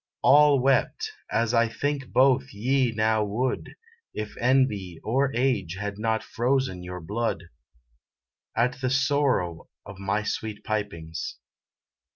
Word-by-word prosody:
All 145 0 +6
wept 135 - +1 0.2
as 115 0 0
I 115 0 +4
think 140 +2 -2
both 130 +1 +3
ye 125 +4 +1
now 110 0 +1
would, 115 +5 -2 0.4
If 105 0 -5
envy 110 -9 +1
or 135 +5 +1
age 115 -9 0
had 100 +1 -5
not 110 0 0
frozen 125 -5 0
your 90 0 -6
blood, 105 0 -2 1.1
At 125 +3 +1
the 130 - +1
sorrow 130 - +1 0.2
of 95 - -10
my 100 +2 -1
sweet 110 -1 -4
pipings. 100 -7 -4
115 Hz, 125 wpm, -26 LUFS, 100-130 Hz, 1.1 s, All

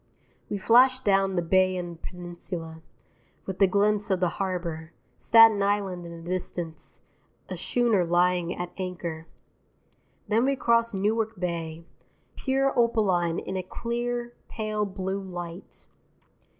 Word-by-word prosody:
We 205 - -2
flash 250 +5 +5
down 195 -4 +2
the 175 - +1
Bayonne 180 -1 +1
peninsula, 175 -2 -7 0.6
with 190 +1 -6
a 195 - +7
glimpse 205 +2 +1
of 190 -2 +2
the 180 -1 +2
harbour, 170 -3 -4 0.3
Staten 225 -3 +7
Island 200 -3 -1
in 170 0 -9
the - - -11
distance, 175 -2 -5 0.5
a - - -4
schooner 235 -6 +1
lying 175 0 +1
at 175 0 -4
anchor. 170 -3 -5 1.0
Then 225 +2 +2
we 275 0 +2
cross 235 -2 +2
Newark 215 +1 0
Bay, 165 -2 -4 0.5
pure 270 0 +1
opaline 195 -8 +2
in 190 - -4
a 185 - -1
clear, 240 +4 -3 0.2
pale 215 -2 -2
blue 190 0 -3
light. 175 -1 -8
190 Hz, 125 wpm, -26 LUFS, 175-220 Hz, 1.0 s, a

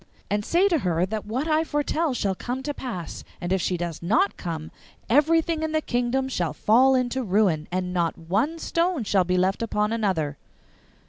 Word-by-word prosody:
And 205 0 +1
say 350 - +3
to 340 -5 +2
her 175 -4 +1
that 215 +1 -5
what 255 +8 -2
I 315 0 +3
foretell 295 -1 -1
shall 200 -4 0
come 245 +7 -5
to 290 +1 -2
pass, 225 - -6 0.2
and 175 +1 -2
if 190 - +1
she 180 - 0
does 170 -2 -4
not 225 - +2
come 160 -3 -5 0.4
everything 315 +5 +3
in 315 0 -2
the 315 - +3
kingdom 245 0 0
shall 175 - -2
fall 260 +5 +4
into 255 +1 0
ruin, 190 -8 +1
and 180 0 -2
not 170 -2 0
one 205 - -1
stone 335 -3 0
shall 195 -3 +2
be 180 +1 +1
left 190 +3 +1
upon 210 -1 0
another. 175 -10 -1
220 Hz, 190 wpm, -25 LUFS, 180-290 Hz, 0.4 s, fall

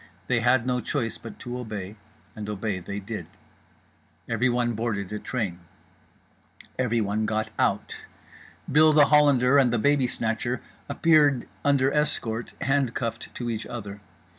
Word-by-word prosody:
They 120 +4 +1
had 120 +1 +3
no 125 -1 0
choice 115 0 -2
but 115 -2 -10
to 125 +1 -5
obey, 105 -4 -6 0.4
and 105 -1 -6
obey 105 -2 -2
they 100 +3 -5
did. 100 -4 -6 1.0
Everyone 120 +1 +1
boarded 105 -3 -3
a 105 - -3
train. 100 -9 -3 1.2
Everyone 110 -3 0
got 110 0 -1
out. - - 0 0.7
Bill 155 +2 +6
The 150 -1 +7
Hollander 140 -3 +5
and 130 -3 +4
The 120 - +1
Babysnatcher 125 -2 0 0.3
appeared 150 -6 +3 0.2
under 140 -2 +3
escort, 120 -6 -1
handcuffed 125 -4 -1
to 120 - -4
each 110 -1 -4
other. 105 -3 -7
120 Hz, 130 wpm, -26 LUFS, 110-130 Hz, 1.2 s, The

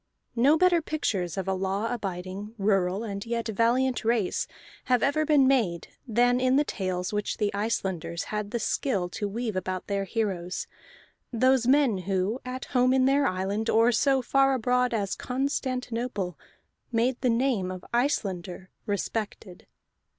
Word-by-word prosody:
No 275 +7 +5
better 355 -1 +4
pictures 200 - -2
of 190 - -3
a 190 - +1
law 195 +4 -1
abiding, 195 0 -5
rural, 195 -1 +1
and 200 -3 -4
yet 235 0 -2
valiant 245 +4 +1
race 225 -4 0 0.4
have 250 -3 +2
ever 305 +2 +1
been 290 -4 +5
made 215 -11 +1 0.2
than 245 +2 +3
in 255 0 +3
the 290 - +4
tales 185 -6 -3
which 210 0 -2
the 210 -2 0
Icelanders 190 -5 -2
had 210 -1 -2
the 235 - -2
skill 210 -5 -1
to 205 +3 -3
weave 225 0 -3
about 185 0 -3
their 200 -1 -1
heroes, 190 -4 -2 0.7
those 255 +1 +3
men 265 -7 +4
who, 195 +6 -1
at 255 0 -5
home 255 0 +2
in 260 -1 +4
their 275 +1 +3
island, 195 +4 -1
or 230 +2 +4
so 265 +2 +2
far 270 +2 +3
abroad 250 +1 +1
as 205 -4 -1
Constantinople, 250 - -2 0.6
made 240 +2 +1
the 255 - +2
name 230 -5 +1
of 185 -1 -7
Icelander 190 -8 -1 0.2
respected. 205 -2 -4
225 Hz, 150 wpm, -27 LUFS, 195-255 Hz, 0.7 s, No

